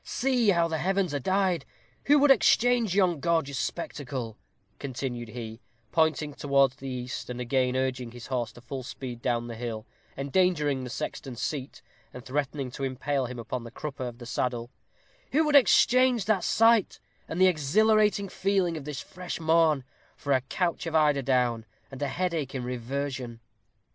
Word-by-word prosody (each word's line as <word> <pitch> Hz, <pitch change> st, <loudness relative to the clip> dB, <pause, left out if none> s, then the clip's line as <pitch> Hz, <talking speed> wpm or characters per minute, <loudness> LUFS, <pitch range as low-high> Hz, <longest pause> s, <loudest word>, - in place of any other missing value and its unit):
See 245 Hz, -3 st, +1 dB
how 170 Hz, -3 st, +3 dB
the 160 Hz, -1 st, -2 dB
heavens 190 Hz, -2 st, 0 dB
are 145 Hz, -, 0 dB
dyed! 185 Hz, 0 st, +1 dB, 0.4 s
Who 290 Hz, +2 st, +6 dB
would 290 Hz, -1 st, +6 dB
exchange 240 Hz, -4 st, +4 dB
yon 180 Hz, -5 st, +3 dB
gorgeous 160 Hz, -4 st, 0 dB
spectacle," 130 Hz, -8 st, -4 dB, 0.4 s
continued 125 Hz, -3 st, -4 dB
he, 115 Hz, -1 st, -7 dB, 0.3 s
pointing 160 Hz, -2 st, +1 dB
towards 140 Hz, -2 st, +2 dB
the 135 Hz, -, -7 dB
east, 125 Hz, -1 st, -5 dB
and 125 Hz, 0 st, -5 dB
again 125 Hz, +1 st, +1 dB
urging 130 Hz, -2 st, -1 dB
his 120 Hz, 0 st, -10 dB
horse 125 Hz, -3 st, -2 dB
to 120 Hz, -, -14 dB
full 130 Hz, +2 st, -6 dB
speed 125 Hz, -1 st, -7 dB
down 120 Hz, -1 st, 0 dB
the 120 Hz, -, -6 dB
hill, 115 Hz, -1 st, -5 dB, 0.3 s
endangering 145 Hz, -2 st, +1 dB
the 125 Hz, -, -6 dB
sexton's 120 Hz, +1 st, -5 dB
seat, 135 Hz, 0 st, -4 dB, 0.3 s
and 125 Hz, -, -9 dB
threatening 140 Hz, -1 st, -2 dB
to 135 Hz, -, -6 dB
impale 135 Hz, 0 st, -1 dB
him 125 Hz, 0 st, -7 dB
upon 120 Hz, +1 st, -4 dB
the 115 Hz, -, -8 dB
crupper 135 Hz, 0 st, -5 dB
of 120 Hz, -1 st, -8 dB
the 120 Hz, -, -10 dB
saddle 120 Hz, 0 st, -2 dB, 0.6 s
"who 310 Hz, +3 st, +4 dB
would 300 Hz, -1 st, +2 dB
exchange 250 Hz, 0 st, +5 dB
that 210 Hz, -4 st, +1 dB
sight, 225 Hz, -2 st, +3 dB, 0.3 s
and 165 Hz, -, -4 dB
the 185 Hz, -, +7 dB
exhilarating 200 Hz, +6 st, +3 dB
feeling 190 Hz, -3 st, 0 dB
of 145 Hz, -, -8 dB
this 150 Hz, -3 st, -5 dB
fresh 180 Hz, -2 st, -7 dB
morn, 160 Hz, -3 st, +3 dB, 0.3 s
for 140 Hz, -, -1 dB
a 130 Hz, -, +3 dB
couch 170 Hz, +6 st, -2 dB
of 165 Hz, -, -3 dB
eiderdown, 130 Hz, -6 st, +2 dB, 0.3 s
and 135 Hz, +1 st, -9 dB
a 145 Hz, -, +1 dB
headache 165 Hz, -4 st, -2 dB
in 130 Hz, -, -3 dB
reversion?" 125 Hz, 0 st, -4 dB
140 Hz, 170 wpm, -27 LUFS, 125-180 Hz, 0.6 s, the